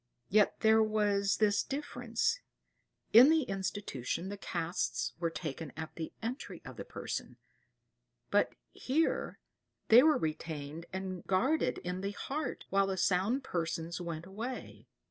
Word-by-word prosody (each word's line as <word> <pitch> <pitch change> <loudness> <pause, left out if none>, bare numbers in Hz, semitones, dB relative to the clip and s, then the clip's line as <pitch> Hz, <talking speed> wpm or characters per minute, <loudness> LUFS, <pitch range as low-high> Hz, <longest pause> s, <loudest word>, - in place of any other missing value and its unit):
Yet 210 +1 +3
there 220 0 +6
was 205 -2 +2
this 210 -1 +3
difference, 275 - -1 0.7
in 245 +6 +10
the 320 -1 +4
institution 190 - -3
the 205 - -4
casts 175 -3 -2
were 170 -1 +1
taken 155 -2 -5
at 160 0 -5
the 160 -1 -5
entry 245 +5 -4
of - - -9
the - - -5
patient; - - -5 0.9
but - - +3 0.2
here 310 +6 0 0.5
they 230 +3 +10
were 305 0 +5
retained 155 - -4
and 190 -1 -4
guarded 260 +12 +2
in 180 +1 -3
the 200 +1 -2
heart 275 +5 -4
while 195 0 +3
the 190 -1 -2
sound 195 +9 +2
persons 170 -1 -3
went 170 -1 -5
away. 225 +7 -6
195 Hz, 135 wpm, -32 LUFS, 170-235 Hz, 0.9 s, in